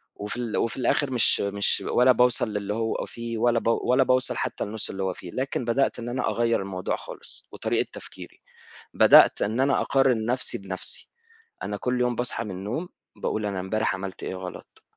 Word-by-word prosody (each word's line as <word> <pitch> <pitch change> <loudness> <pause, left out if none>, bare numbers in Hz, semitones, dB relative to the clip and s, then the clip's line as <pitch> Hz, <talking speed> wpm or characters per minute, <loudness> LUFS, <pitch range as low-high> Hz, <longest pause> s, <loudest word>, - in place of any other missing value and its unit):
وفي 105 +3 -5
ال 120 -3 -2
وفي 115 - -1
الآخر 130 +2 +1
مش 120 -4 +4
مش 100 0 +1
ولا 125 +1 +5
باوصل 125 -3 +3
للي 105 0 -2
هو 115 0 -2
فيه 115 -1 -6
ولا 120 0 +2
ولا 125 +3 +3
باوصل 130 0 +1
حتّى - - -2
لنص 105 +1 -3
اللي 95 0 -4
هو 95 -1 -1
فيه 90 - -10
لكن 130 -2 -2
بدأت 130 +3 +1
إن 120 +1 -5
أنا 130 +2 -1
أغيّر 115 -3 +1
الموضوع 95 -1 -3
خالص، - - -9
وطريقة - - -1
تفكيري، - - -11 0.5
بدأت - - +7
إن 110 +5 0
أنا 135 0 +2
أقارن 130 -5 +2
نَفْسي 125 +2 +1
بنَفْسي، 95 -1 -3 0.5
أنا 105 - -3
كل 125 +2 -1
يوم 125 -1 +1
باصحى 120 -1 -1
من 105 - -6
النوم، 105 - -4 0.3
باقول 110 -1 -2
أنا 100 -2 -2
إمبارح 110 +3 -1
عملت 95 0 -7
إيه 95 - -4
غلط، 90 -1 -9
115 Hz, 185 wpm, -25 LUFS, 100-125 Hz, 0.5 s, بدأت